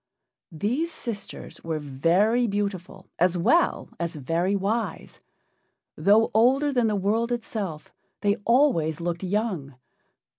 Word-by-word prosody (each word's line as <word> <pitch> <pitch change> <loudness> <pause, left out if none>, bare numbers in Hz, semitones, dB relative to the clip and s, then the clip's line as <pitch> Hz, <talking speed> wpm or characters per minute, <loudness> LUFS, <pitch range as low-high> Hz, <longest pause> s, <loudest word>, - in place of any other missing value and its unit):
These 245 - -1
sisters 230 -9 -7
were 160 -1 -2
very 170 - +2
beautiful 200 -2 -3
as 180 +1 +3
well 335 - +2
as 170 -1 -3
very 165 +7 0
wise. 200 -1 -3 0.8
Though 205 +7 +4
older 270 +6 +3
than 245 -3 +2
the 210 - 0
world 215 +5 0
itself, 210 -9 -4 0.3
they 205 0 +2
always 230 - +3
looked 170 0 -3
young. 185 - -2
200 Hz, 115 wpm, -25 LUFS, 170-230 Hz, 0.8 s, Though